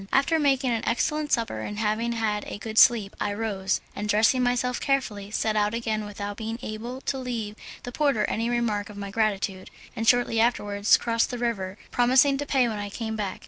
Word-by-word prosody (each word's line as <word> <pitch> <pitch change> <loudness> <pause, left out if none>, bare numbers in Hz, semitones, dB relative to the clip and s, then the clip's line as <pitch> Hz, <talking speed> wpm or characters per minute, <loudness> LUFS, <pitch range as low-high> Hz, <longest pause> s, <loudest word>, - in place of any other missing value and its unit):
After 315 +4 +3
making 270 -3 +2
an 230 -1 0
excellent 300 +5 0
supper 230 - 0
and 205 - -5
having 220 +2 0
had 215 -2 -1
a - - -5
good 220 +1 0
sleep, 220 -5 +5
I 205 -1 -1
rose, 200 -3 -1
and 210 +1 -4
dressing 225 +5 +4
myself 250 0 0
carefully 215 -8 -1
set 215 0 -1
out 210 +1 +1
again 220 -2 -2
without 205 0 -6
being 225 0 -4
able 235 +4 -6
to 270 0 -2
leave 230 -5 -4 0.3
the 245 - -6
porter 280 -5 +1
any 230 +2 -1
mark 210 -2 -1
of 205 - -10
my 200 -1 -6
gratitude, 200 -3 -1 0.3
and 225 +1 -3
shortly 245 -2 +3
afterwards 205 -3 +3
crossed 230 -1 0
the 245 - -4
river, 210 -5 -2
promising 260 +3 +4
to 290 - -3
pay 260 -4 +3
when 215 -2 -3
I 205 0 -4
came 220 +1 -4
back. 205 -3 -3
225 Hz, 200 wpm, -26 LUFS, 210-245 Hz, 0.3 s, sleep